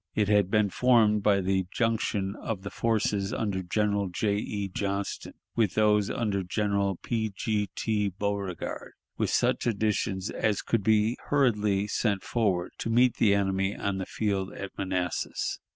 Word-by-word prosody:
It 105 -2 +1
had 105 -3 +3
been 105 -1 +2
formed 110 -1 +4
by 100 -1 +3
the 95 -1 0
junction 105 -4 -1
of 105 -4 -4
the 100 - -6
forces 105 -3 0
under 100 -4 -1
General 100 +1 0
J. 100 +3 0
E. 100 -1 -3
Johnston 100 +1 -3 0.2
with 110 -5 +1
those 105 -1 +3
under 105 -4 -1
General 100 +1 0
P. 110 +3 -2
G. 105 -1 -1
T. 105 -2 0
Beauregard, 100 -1 -4 0.3
with - - +1
such - - +1
additions 105 -3 0
as 110 -3 0
could 115 - 0
be 110 +3 +3
hurriedly 105 -8 +2
sent 100 -2 0
forward 95 -7 0
to - - -3
meet 120 +2 +3
the 100 -3 +4
enemy 95 0 0
on 100 -1 -2
the 95 - -4
field 100 -3 -1
of 95 -1 -6
Manassas. 95 -2 -2
100 Hz, 155 wpm, -28 LUFS, 95-110 Hz, 0.3 s, formed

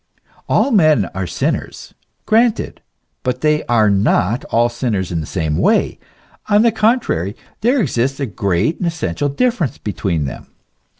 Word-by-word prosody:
All 280 - +2
men 155 - +4
are 95 -1 -3
sinners. - - -3 0.3
Granted: 230 +1 +1 0.4
but 125 -1 -2
they 150 0 +2
are 115 -3 +3
not 100 +2 +1
all 120 +1 +2
sinners 115 -7 -2
in 85 - -1
the 75 - -5
same 80 -1 -2
way; - - +1 0.5
on 210 +1 +4
the 235 - +4
contrary, 215 - 0 0.2
there 250 +5 +2
exists 135 - 0
a 140 - 0
great 100 - -1
and 180 - -1
essential 145 - -2
differ 230 - +1
ence 125 - -6
between 90 -6 -2
them. 70 - -7
125 Hz, 155 wpm, -18 LUFS, -, 0.5 s, men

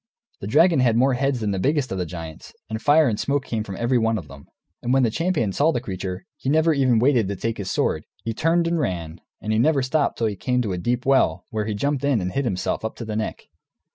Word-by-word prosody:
The 100 - -6
dragon 165 - +4
had 120 -3 +3
more 130 +2 +3
heads 135 -1 0
than 105 -2 0
the 95 - -1
biggest 140 +2 0
of 95 - -2
the 90 - -2
giants, 80 -2 -9 0.2
and 110 0 -3
fire 150 +3 +5
and 110 -3 -1
smoke 140 -1 0
came 110 -2 -2
from 100 -3 -7
every 120 +1 +1
one 115 0 +1
of 80 - -7
them. 70 0 -13 0.3
And 120 - -2
when 135 0 +4
the 115 - +2
champion 165 - 0
saw 150 - +3
the 140 - -1
creature, 95 -4 -5
he 130 - -3
never 160 +2 +3
waited 130 -2 +3
even - - -4
to 100 - -3
take 115 +3 -3
his 95 - -4
sword, - - 0 0.2
he 115 - -2
turned 165 +7 +2
and 170 0 0
ran; 85 - -3 0.2
and 110 - -2
he 110 - +2
never 140 +1 +3
stopped 145 +3 0
till 115 - 0
he 105 -2 -1
came 125 +5 0
to 100 -4 -2
a 90 - -3
deep 120 +6 -1
well, 90 -10 +2
where 110 -1 -2
he 105 -1 -2
jumped 140 +5 -1
in 140 -5 +2
and 90 -1 -3
hid 135 +7 -1
himself, 95 -3 -2
up 110 - -4
to 115 - -7
the 110 -1 -4
neck. 110 0 -3
115 Hz, 265 wpm, -23 LUFS, 100-140 Hz, 0.3 s, fire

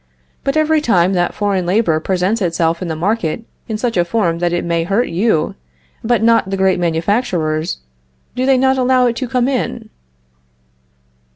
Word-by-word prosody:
But 275 +3 0
every 310 0 +2
time 190 - +2
that 175 -1 0
foreign 195 -4 -1
labor 180 -5 +2
presents 190 +6 -1
itself 170 -1 0
in 180 - -3
the 160 - -3
market 185 +2 -1 0.2
in 220 - -3
such 235 +1 -2
a 175 - +4
form 175 -3 -1
that 175 0 0
it 175 0 -1
may 170 -1 0
hurt 200 +8 0
you, 170 -3 0 0.5
but 230 -1 +1
not 230 -4 +3
the 195 - -2
great 190 -1 +2
manufacturers, 165 -2 -1 0.6
do 255 +1 -1
they 270 -1 +4
not 265 +1 +2
allow 255 0 +3
it 240 -1 +1
to 260 - -3
come 250 0 0
in? 240 -4 -3
195 Hz, 175 wpm, -17 LUFS, 170-240 Hz, 0.6 s, a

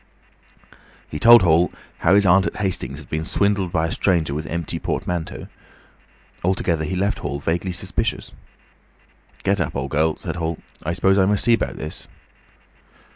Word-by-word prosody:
He 75 - -5
told 120 +3 +8
Hall 85 +1 +3 0.3
how 85 +4 +4
his 100 0 +5
aunt 95 +1 +5
at - - -5
Hastings 90 -9 -3
had 75 - -11
been 80 0 -1
swindled 100 +1 0
by 80 -2 +1
a 80 - -3
stranger 85 -7 +1
with 75 +2 -4
empty 85 -2 -3
portmanteaux. 85 -2 -3 1.0
Altogether 85 -3 0
he 95 - -3
left 100 +3 0
Hall 70 - -4
vaguely 85 +5 -1
suspicious. 90 - -3 1.1
"Get - - +1
up, - - -3
old 70 0 -3
girl," 80 +2 +1
said - - -5
Hall. 80 -1 -2 0.3
"I 85 - -2
s'pose 95 +2 +3
I 95 - +5
must 105 0 +1
see 120 - +5
'bout - - -3
this." 75 - -8
85 Hz, 165 wpm, -22 LUFS, 80-95 Hz, 1.1 s, told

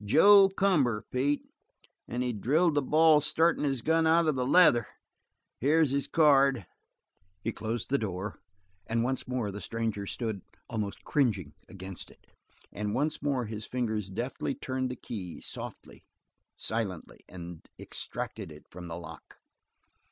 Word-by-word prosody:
"Joe 195 - +7
Cumber, 155 - +1
Pete. 140 +3 0 0.6
And 120 +2 -2
he 125 -1 -1
drilled 150 - +2
the 145 - +2
ball 155 +2 +5
startin' 165 +3 +2
his 135 -5 -1
gun 160 0 +3
out 165 +1 +4
of 155 - +3
the 125 -1 -1
leather. 135 -8 +5 0.7
Here's 150 +2 +3
his 140 0 0
card." 140 - +4 0.8
He 115 - -1
closed 115 +2 -4
the 140 - +3
door, 100 -1 -4 0.5
and 115 0 0
once 130 +1 -2
more 125 -5 -2
the 105 +1 -7
stranger 110 -3 -3
stood 110 -4 -3 0.3
almost 105 -4 -4
cringing 105 - 0 0.2
against 95 -1 -8
it, - - -21 0.5
and 105 0 -3
once 150 +3 0
more 140 -4 0
his 110 0 -6
fingers 110 -5 -2
deftly 120 +7 -3
turned 130 0 -3
the 125 - -4
key 95 -8 -7
softly, - - -8 0.5
silently 105 -7 -3
and 85 -2 -9
extracted - - -6
it 75 0 -13
from 90 0 -9
the 85 0 -6
lock. 85 -2 -11
125 Hz, 145 wpm, -29 LUFS, 105-145 Hz, 0.8 s, Joe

